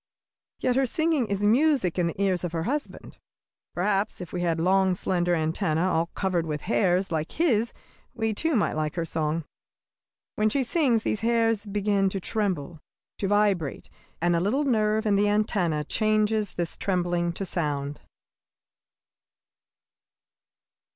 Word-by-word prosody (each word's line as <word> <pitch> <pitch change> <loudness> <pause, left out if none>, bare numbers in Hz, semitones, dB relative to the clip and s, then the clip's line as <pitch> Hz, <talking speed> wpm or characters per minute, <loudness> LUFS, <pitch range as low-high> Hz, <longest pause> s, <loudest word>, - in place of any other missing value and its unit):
Yet 255 0 0
her 270 -1 +3
singing 315 -3 +1
is 200 0 -2
music 235 - +3
in 175 - +2
the 170 - -5
ears 190 -3 +1
of 175 -1 -3
her 165 -1 -1
husband. 290 - -4 0.6
Perhaps 195 +3 0
if 180 - -8
we 180 - -2
had 165 -2 0
long, 190 +2 +3
slender 175 -1 0
antennæ, 160 +1 0
all 165 -2 +1
covered 180 -4 0
with 150 -1 -3
hairs, 190 -4 +1
like 160 -1 -2
his, 240 -9 +1 0.4
we, 225 -2 -1
too, 320 +8 0
might 215 - +1
like 155 -1 -2
her 170 -1 -1
song. 160 -1 -2 0.9
When 215 0 +3
she 270 +4 +1
sings 250 -5 +2
these 215 - -1
hairs 225 -2 +1
begin 200 -1 +1
to 195 - -3
tremble, 180 -7 -2 0.4
to 195 - 0
vibrate, 200 -7 0 0.3
and 175 +1 +2
a - - +2
little 220 +11 +1
nerve 220 -4 +1
in 205 -2 +3
the 205 - +3
antennæ 200 -7 +1
changes 215 -1 +1
this 170 -2 -4
trembling 175 -2 0
to 195 - -4
sound. 145 -5 -3
195 Hz, 150 wpm, -26 LUFS, 170-215 Hz, 0.9 s, her